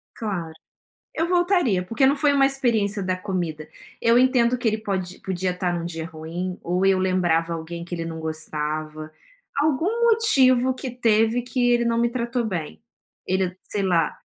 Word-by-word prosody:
Claro. 175 -8 -4 0.6
Eu 330 +2 0
voltaria, 350 - +2
porque 230 +8 +1
não 280 +2 +4
foi 285 +1 +3
uma 275 -1 +4
experiência 225 -7 0
da 185 0 -1
comida. 170 -5 -4 0.3
Eu 235 +1 +4
entendo 250 -1 +3
que 240 - -2
ele 215 0 +1
pode 190 -4 -4
podia 185 -1 -2
estar 180 -1 -2
em - - -2
um - - -5
dia 165 -2 -5
ruim, 165 +3 -5
ou 180 +2 0
eu 190 -1 +4
lembrava 175 -3 +1
alguém 170 +1 -6
que 175 0 -5
ele 165 0 -4
não 165 -1 -6
gostava. 155 0 -4 0.5
Algum 335 - +1
motivo 260 - +4
que 260 -1 -5
teve, 225 0 +2
que 245 0 0
ele 240 0 +2
não 230 0 +1
me 235 0 +2
tratou 240 -1 -2
bem, 160 - -4 0.5
ele 185 -1 -1
sei 205 - 0
lá. 170 -5 +1
195 Hz, 175 wpm, -23 LUFS, 170-245 Hz, 0.6 s, não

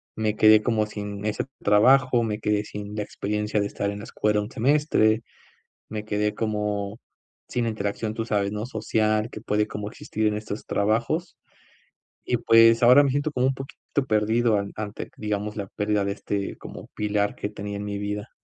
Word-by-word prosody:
me 110 -1 0
quedé 110 0 +7
como 110 -1 +1
sin 105 -1 -6
ese 105 -1 -1 0.2
trabajo. 125 +4 +5
Me 105 -1 -2
quedé 105 -1 +1
sin 105 0 -7
la 105 - -2
experiencia 105 +1 -2
de 100 - +1
estar 100 0 -2
en 100 - -6
la 105 - -8
escuela 105 -1 0
un 105 +3 -7
semestre. 115 -4 +2 0.7
Me 110 -1 -4
quedé 105 0 0
como 105 -1 -2 0.5
sin 120 -1 -1
interacción, 110 0 -2
tú 115 - -2
sabes, 100 -3 0
¿no?, 105 +1 -3
social, 110 -1 0
que 110 - -8
puede 105 0 +1
como 105 0 -5
existir 110 0 -3
en 105 - +1
estos 105 0 -6
trabajos. 115 - 0 0.9
Y - - +1
pues, 115 0 +6
ahora 125 +4 +8
me 140 - +2
siento 145 +3 0
como 125 -2 +1
un 135 - 0
poquito 135 +1 -9 0.3
perdido 110 +1 +2
an 100 0 -4
ante, 105 -1 -5
digamos, 105 0 -3
la 100 -2 -4
pérdida 105 0 0
de 100 - -1
este, 100 -1 -3
como - - -10
pilar 105 -1 0
que 105 - -3
tenía 100 -1 -6
en 105 - -5
mi 100 0 -3
vida. 105 +1 -4
105 Hz, 185 wpm, -25 LUFS, 105-115 Hz, 0.9 s, ahora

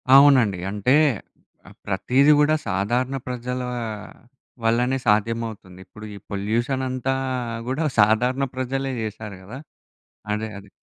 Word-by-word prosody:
అవునండి. 130 -9 +6
అంటే, 105 +7 +2 0.7
ఆ! - - -11 0.2
ప్రతీది 130 +9 +3
గూడా 150 +1 +4
సాధారణ 120 +8 0
ప్రజల 125 0 -3 1.0
వల్లనే 125 +3 +2
సాధ్యమవుతుంది. 110 -3 -1
ఇప్పుడు 105 0 -12
ఈ - - -8
పొల్యూషన్ 115 +7 -1
అంతా 130 +1 -1 0.5
గూడా 145 +5 -1
సాధారణ 125 +6 +3
ప్రజలే 135 +1 -2
చేశారు 105 -1 -6
కదా! 110 +7 -9 0.8
అదే, 110 +1 -2
అదే. 100 0 -14
120 Hz, 110 wpm, -23 LUFS, 105-130 Hz, 1.0 s, అవునండి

